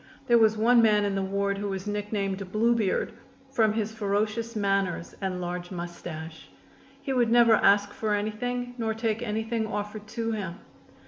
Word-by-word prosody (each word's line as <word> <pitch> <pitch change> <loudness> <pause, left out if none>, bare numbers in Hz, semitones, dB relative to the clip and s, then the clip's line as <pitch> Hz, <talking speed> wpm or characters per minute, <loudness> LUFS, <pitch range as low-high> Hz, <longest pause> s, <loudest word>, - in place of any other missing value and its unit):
There 235 -1 +5
was 220 -1 +4
one 235 +2 +5
man 210 -2 +4
in 200 - 0
the 195 - 0
ward 200 +1 -1
who 205 0 -2
was 190 0 -4
nicknamed 200 -2 -3
"Blue 230 +3 +3
Beard," 215 -5 0 0.4
from 220 -5 +3
his 215 -1 -1
ferocious 215 +2 -1
manners 195 -4 0
and 190 -2 -2
large 175 0 -4
mustache. 170 -3 -7 0.5
He 275 - -1
would 240 -3 +2
never 235 -1 +6
ask 200 -1 +4
for 215 -2 0
anything 245 +4 -3
nor 220 -1 -1
take 225 0 -1
anything 220 0 -2
offered 210 0 -5
to 230 +1 -3
him. 190 -6 -3
210 Hz, 170 wpm, -27 LUFS, 195-225 Hz, 0.5 s, never